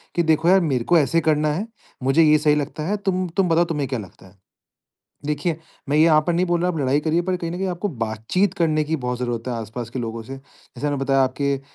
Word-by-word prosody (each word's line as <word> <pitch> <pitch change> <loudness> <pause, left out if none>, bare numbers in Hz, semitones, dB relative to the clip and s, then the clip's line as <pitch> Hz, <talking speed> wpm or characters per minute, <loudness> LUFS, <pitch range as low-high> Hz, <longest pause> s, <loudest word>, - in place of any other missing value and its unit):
कि 170 - +2
देखो 160 +2 +2
यार 190 0 +6
मेरे 135 -7 0
को - - +8
ऐसे 165 +2 +2
करना 150 0 +2
है, 195 +8 -3 0.4
मुझे 135 +5 +4
ये 155 0 +5
सही 150 -1 +3
लगता 150 +1 -3
है 210 - 0
तुम 185 -2 -1
तुम 185 -3 +3
बताओ 165 +1 +3
तुम्हें 150 -5 -2
क्या 130 -4 -2
लगता 95 0 -12
है? 95 +1 -21 0.9
देखिए 150 +2 -1 0.3
मैं 145 - +2
ये 155 - +6
यहाँ 155 -2 +5
पर 175 - +2
नहीं 175 +2 +1
बोल 175 -1 0
रहा 180 - +1
आप 170 - -2
लड़ाई 140 +1 +2
करिए 160 +3 +1
पर 185 +1 -1
कहीं 170 -1 -4
न 175 - -4
कहीं 190 +1 -2
आपको 180 +3 -2
बातचीत 115 - -1
करने 155 -4 +1
की 155 +2 -1
बहुत 125 0 -2
ज़रूरत 120 -1 -3
है 125 - -2
आस-पास 115 +1 -6
के 125 +1 -5
लोगों 115 -1 -4
से, 135 +4 -8
जैसे 135 0 -11
मैंने 145 - -1
बताया 135 0 +2
आपके 140 +2 0
अ, - - -7
150 Hz, 260 wpm, -22 LUFS, 130-170 Hz, 0.9 s, को